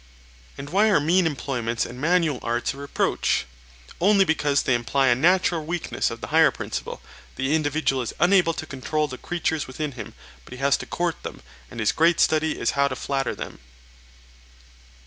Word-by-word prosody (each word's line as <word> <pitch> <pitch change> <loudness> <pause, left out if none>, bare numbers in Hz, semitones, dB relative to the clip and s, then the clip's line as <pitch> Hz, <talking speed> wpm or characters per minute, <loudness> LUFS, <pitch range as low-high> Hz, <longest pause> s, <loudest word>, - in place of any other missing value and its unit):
And 140 +1 -8
why 205 +4 +4
are 195 - +4
mean 170 +4 +3
employments 125 -6 -2
and 125 +2 -9
manual 165 -4 +2
arts 120 +1 -1
a - - -13
reproach? 140 - 0 0.5
Only 195 +2 +4
because 150 -4 +1
they 130 - +1
imply 120 +3 +1
a - - +6
natural 170 +3 +2
weakness 170 +2 -2
of - - -8
the - - -6
higher - - +5
principle; - - -6 0.3
the 135 +3 -1
individual 150 -3 +1
is 120 - -4
unable 175 -2 +4
to - - -5
control 150 +2 -2
the 130 -2 -8
creatures 160 -3 -2
within 145 +3 -4
him, 115 -6 -9 0.3
but 125 - -11
has 140 +1 +3
to - - -8
court 175 -1 -2
them, - - -8 0.3
and 120 - -9
his 110 - +2
great 165 +1 +3
study 155 0 +2
is 115 - +1
how 140 0 +2
to 130 - -4
flatter 135 0 -2
them. - - -8
145 Hz, 180 wpm, -24 LUFS, 130-165 Hz, 0.5 s, a